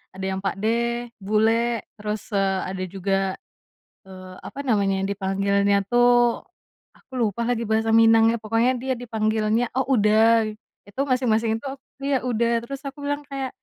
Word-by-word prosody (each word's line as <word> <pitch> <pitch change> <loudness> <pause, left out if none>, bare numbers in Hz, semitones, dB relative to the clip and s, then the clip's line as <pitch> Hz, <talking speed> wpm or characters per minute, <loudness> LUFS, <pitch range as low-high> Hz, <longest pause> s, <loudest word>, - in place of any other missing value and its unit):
Ada 190 0 -5
yang 190 - -3
pakde, 235 +4 -1
bulek, 225 +3 +1
terus, 210 0 -5
eee, 195 -1 +1
ada 185 -1 -4
juga, 195 0 -2 0.9
eee, 185 -1 -11
apa 280 - -10
namanya 195 -4 +1
dipanggilannya 200 0 +1
tuh 240 0 +3 0.5
aku - - -30
lupa 220 +1 0
lagi 235 -1 0
bahasa 220 +1 0
Minangnya, 225 0 +5
pokoknya 225 +3 +2
dia 260 0 -1
dipanggilnya 220 0 0
oh, 265 0 0
uda. 220 +1 +4 0.4
Itu 205 +7 -4
masing-masing 225 -3 +1
itu 240 - -12
aku 275 - -14 0.2
iya 280 -1 +2
uda, 235 -2 0 0.2
terus 270 +3 -7
aku 280 +1 -7
bilang 290 0 -1
kayak, 270 -2 -4
225 Hz, 145 wpm, -23 LUFS, 200-240 Hz, 0.9 s, Minangnya